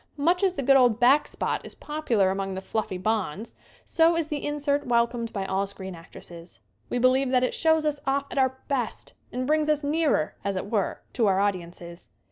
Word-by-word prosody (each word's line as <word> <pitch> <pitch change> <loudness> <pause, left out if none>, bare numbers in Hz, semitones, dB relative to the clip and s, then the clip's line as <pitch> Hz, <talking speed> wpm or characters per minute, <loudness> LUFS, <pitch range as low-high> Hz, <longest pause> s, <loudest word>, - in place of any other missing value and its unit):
Much 340 +5 +2
as 385 -2 +2
the 280 - -3
good 275 +2 +5
old 245 -4 +4
"back 265 +4 +5
spot" - - -2
is - - -9
popular 240 -11 0
among 195 0 -3
the - - -3
fluffy 195 -1 -3
bonds, 215 +1 -2 0.3
so 330 0 +3
is 320 -2 -2
the 295 -2 -3
insert 290 -1 -1
wel 235 -1 +4
comed 235 -1 -6
by 195 -2 -3
all 195 +1 -1
screen 190 -1 -7
actresses. 170 0 -12 0.3
We - - -1
believe 255 +2 +3
that 255 -1 +2
it 255 - 0
shows 320 -1 +2
us 295 -1 -1
off 275 +1 +1
at - - -1
our 260 0 +1
best 255 -6 -3 0.2
and 255 +1 -3
brings 305 +2 +1
us 300 -1 +1
nearer, 295 - +1
as 200 -1 -2
it 190 +2 -5
were, 205 -4 -1
to 230 -4 +2
our 190 -1 +2
audiences. 175 - -4
245 Hz, 210 wpm, -26 LUFS, 195-290 Hz, 0.3 s, good